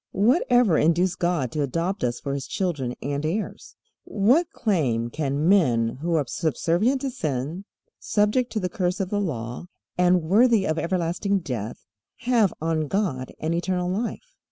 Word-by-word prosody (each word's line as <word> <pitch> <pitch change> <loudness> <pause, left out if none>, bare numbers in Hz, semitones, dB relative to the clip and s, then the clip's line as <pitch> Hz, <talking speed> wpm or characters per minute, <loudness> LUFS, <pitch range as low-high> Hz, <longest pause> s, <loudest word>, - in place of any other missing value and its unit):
What 235 - +3
ever 245 -9 +4
induced 175 +3 +2
God 170 -8 0
to 150 - -2
adopt 165 +8 -2
us 120 -1 -1
for 140 - -4
His 140 -1 -4
children 150 -10 -2
and 140 +2 -2
heirs? 180 +8 -4 0.3
What 250 - +2
claim 125 - 0
can 145 +1 -1
men 125 -13 +3
who 170 +1 0
are 150 -3 +1
subservient 175 - 0
to 275 - -2
sin, 155 - -3 0.3
subject 210 +4 +1
to 220 - 0
the 185 - -1
curse 180 -3 -1
of 190 -2 -2
the 205 -1 0
Law, 125 - -4 0.3
and 180 -1 +4
worthy 215 +4 +4
of 155 -2 0
everlasting 180 +3 0
death, 120 -7 -5 0.4
have 230 -6 +3
on 160 -1 -1
God 145 -9 -1
and 160 +2 -1
eternal 180 +1 -1
life? 240 - -4
175 Hz, 160 wpm, -24 LUFS, 145-205 Hz, 0.4 s, ever